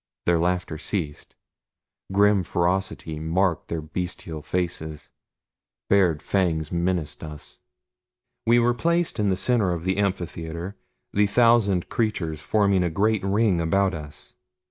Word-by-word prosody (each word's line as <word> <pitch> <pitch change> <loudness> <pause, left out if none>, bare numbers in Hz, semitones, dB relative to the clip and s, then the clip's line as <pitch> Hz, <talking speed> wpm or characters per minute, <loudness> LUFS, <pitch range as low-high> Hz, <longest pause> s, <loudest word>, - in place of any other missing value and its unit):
Their 85 -1 +3
laughter 90 -2 -1
ceased. 85 -6 -4 0.8
Grim 100 0 +4
ferocity 90 -2 -1
marked 85 +2 0
their 80 -2 -3
bestial 80 -1 -5
faces 80 -2 -4 0.8
bared 90 -6 +3
fangs 85 -5 0
menaced 85 -3 -1
us. 75 -2 -9 0.9
We 120 +1 +6
were 120 0 +3
placed 170 +2 0
in 105 -1 +2
the 95 - +2
center 105 -1 +1
of 85 -1 -3
the 95 +1 0
amphitheater 85 -2 -3 0.4
the 105 0 +3
thousand 110 -5 +3
creatures 85 -9 -1
forming 100 +2 +2
a 90 - +1
great 105 +5 +1
ring 100 -2 +2
about 95 +3 +2
us. 75 -3 -8
90 Hz, 125 wpm, -24 LUFS, 80-100 Hz, 0.9 s, We